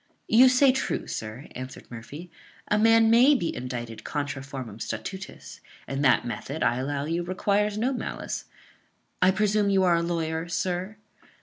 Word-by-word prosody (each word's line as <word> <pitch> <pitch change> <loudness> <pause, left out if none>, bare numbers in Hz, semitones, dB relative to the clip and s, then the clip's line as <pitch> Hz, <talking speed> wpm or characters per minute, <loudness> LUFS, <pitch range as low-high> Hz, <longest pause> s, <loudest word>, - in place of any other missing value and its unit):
"You 250 +4 +7
say 255 +1 +5
true, 265 +1 -2
sir," 110 +6 -6
answered 130 0 -9
Murphy; 145 +9 -9 0.4
"a 210 - +3
man 225 0 +5
may 255 +6 +6
be 170 -10 -2
indicted 120 -2 -6
contra 140 -2 -3
formam 130 -6 -8
statutis; 185 - -7 0.3
and 135 +1 -3
that 135 - +4
method, 140 +5 -4
I 120 +1 +2
allow 140 +2 -2
you, 165 +3 -1
requires 200 +4 0
no 250 +5 0
malice. 250 - -5 0.8
I 185 - +6
presume 205 +1 +2
you 195 -1 +3
are 175 -2 +4
a - - +1
lawyer, 165 -1 -2
sir?" 185 +3 -2
170 Hz, 160 wpm, -26 LUFS, 135-210 Hz, 0.8 s, You